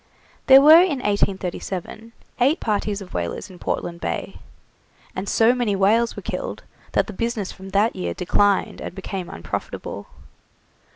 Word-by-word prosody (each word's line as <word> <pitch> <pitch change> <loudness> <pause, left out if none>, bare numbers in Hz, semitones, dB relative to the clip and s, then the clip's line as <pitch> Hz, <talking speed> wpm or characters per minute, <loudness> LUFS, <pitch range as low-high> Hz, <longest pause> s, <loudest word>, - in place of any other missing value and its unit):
There 265 0 +9
were 315 +4 +9
in 350 -6 +1
1837 200 0 -2 0.3
eight 275 +8 +3
parties 210 -1 -1
of 190 - -11
whalers 90 - -4
in 180 - -14
Portland 170 0 -3
Bay, - - -4 0.8
and 190 +1 -4
so 230 +2 +4
many 240 -5 0
whales 220 +5 +2
were - - -8
killed - - -5 0.3
that - - +3
the 215 - -8
business 225 -1 -2
from 190 0 -11
that 200 +4 +2
year 85 -1 -3
declined 200 +2 +1
and - - -7
became 190 -2 -5
unprofitable. 85 - -6
205 Hz, 150 wpm, -22 LUFS, 190-235 Hz, 0.8 s, There